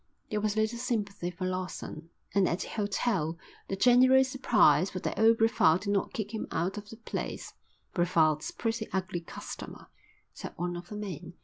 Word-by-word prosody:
There 210 -1 0
was 210 0 0
little 220 +2 0
sympathy 210 -7 -2
for 180 +1 -5
Lawson, 185 -3 -4 0.2
and 195 -2 +3
at 170 - -1
the - - -5
hotel 200 -6 -1 0.3
the 195 - -2
general 255 +5 +6
surprise 245 -7 +3
was 185 - -4
that - - -2
old 225 +1 +6
Brevald 220 -7 +4
did 200 0 -2
not 195 - 0
kick 215 0 -4
him 220 - -3
out 175 +5 -1
of 210 0 -8
the 225 - -10
place. 230 - -5 0.4
"Brevald's 160 -3 +2
a - - -9
pretty 225 -1 -2
ugly 185 -2 -2
customer," 165 - -9 0.4
said - - -7
one 175 +1 -2
of 175 0 -8
the 210 - -6
men. 180 -5 -6
200 Hz, 185 wpm, -30 LUFS, 175-225 Hz, 0.4 s, general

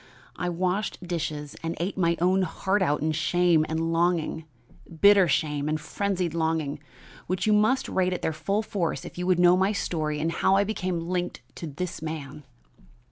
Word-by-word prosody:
I 180 - -2
washed 180 +1 -2
dishes 155 -4 -3
and 165 0 -4
ate 180 +4 -2
my 170 -3 +1
own 185 +2 +3
heart 190 +3 0
out 150 -5 +1
in 160 - +1
shame 165 0 +2
and 165 +1 -1
longing 165 -2 0 0.5
bitter 200 -1 +7
shame 150 0 0
and 155 0 0
frenzied 185 +1 -2
longing, 160 -3 -1 0.5
which 185 +1 -1
you 215 - +4
must 220 +5 +3
rate 185 -1 +1
at 180 - -4
their 160 - 0
full 200 +7 -1
force 175 -9 -2
if - - -9
you 180 - -2
would 185 -2 +3
know 175 0 +6
my 190 +3 +2
story 155 -6 -2
and 165 +2 0
how 190 - +2
I 200 - +4
became 185 -4 -2
linked 180 -5 -3
to 165 - -5
this 160 +3 -5
man. 150 -2 -6
175 Hz, 185 wpm, -26 LUFS, 160-185 Hz, 0.5 s, bitter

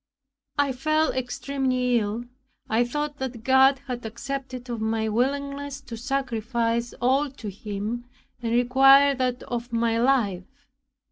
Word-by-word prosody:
I 285 -1 +2
fell 310 +5 +1
extremely 255 -1 0
ill. 215 +3 -3 0.4
I 225 +2 +2
thought 295 +4 -3
that 250 -4 -5
God 265 +1 +5
had 250 -3 -5
accepted 255 +2 -5
of 235 -2 -4
my 220 0 0
willingness 280 +4 -1
to 230 - -8
sacrifice 235 -2 -1
all 270 +4 +2
to 230 -6 -7
him, 210 +4 -5 0.4
and 230 -1 -2
required 270 +3 +5
that 250 -1 -1
of 240 0 -5
my 230 0 +1
life. 250 +1 0
250 Hz, 130 wpm, -25 LUFS, 230-275 Hz, 0.4 s, God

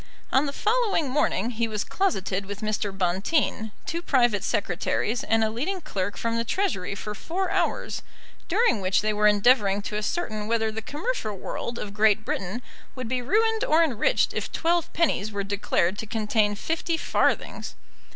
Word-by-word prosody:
On 270 +3 +4
the - - -2
following 415 - +1
morning 245 -6 +1
he 230 0 -1
was 215 -2 -2
closeted 200 - -1
with 205 +1 -6
Mr. 215 -1 -1
Bonteen, 195 - 0
two 340 -1 -3
private 240 - +2
secretaries, 205 +5 0
and 225 0 +2
a 215 - +1
leading 320 - -2
clerk 200 - -3
from 230 0 -1
the 230 - +1
Treasury 230 - -1
for 210 +2 -5
four 365 - -3
hours, - - -1 0.5
during 250 - +2
which 185 0 +2
they 215 0 +1
were 210 0 +4
endeavouring 205 -1 +4
to 210 - -3
ascertain 215 -2 -2
whether 225 -1 +1
the 220 +1 -4
commercial 290 - -3
world 235 +5 -5
of 200 -3 -5
Great 215 0 +3
Britain 195 +7 -3 0.3
would 255 -2 -5
be 255 0 0
ruined 440 - +2
or 320 +2 +4
enriched 315 - +2
if - - -3
twelve 340 0 +1
pennies 265 - +1
were 200 -1 -2
declared 195 -1 0
to 220 - -5
contain 215 -1 +1
fifty 325 +7 -1
farthings. - - 0
225 Hz, 170 wpm, -26 LUFS, 205-310 Hz, 0.5 s, On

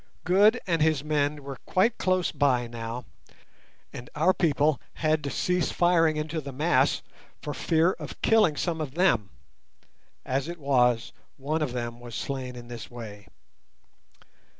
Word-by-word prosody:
Q. 180 - 0
Good 210 +5 +6
and 165 -4 0
his 155 -3 +2
men 150 -1 0
were 135 -1 -7
quite 220 +5 +2
close 185 -1 +1
by 130 -4 +2
now, 115 +1 -6 0.9
and 120 - -8
our 165 +5 +3
people 150 -4 +1
had 155 -1 0
to 140 - -2
cease 180 +4 0
firing 165 -3 +3
into 155 +1 -3
the 140 -1 -7
mass 150 +6 +2 0.4
for 145 - -5
fear 165 +5 +2
of - - -8
killing 215 -9 +4
some 165 -3 -1
of 145 -2 -5
them 120 - +2 1.0
(as 135 +3 -1
it 170 0 -6
was, 125 -5 +2 0.2
one 150 +4 -2
of 140 -5 -1
them 120 -1 -4
was 120 -2 -9
slain 130 -2 -4
in 120 -1 -10
this 120 -2 -8
way). 105 -5 -9
150 Hz, 155 wpm, -27 LUFS, 125-165 Hz, 1.0 s, Good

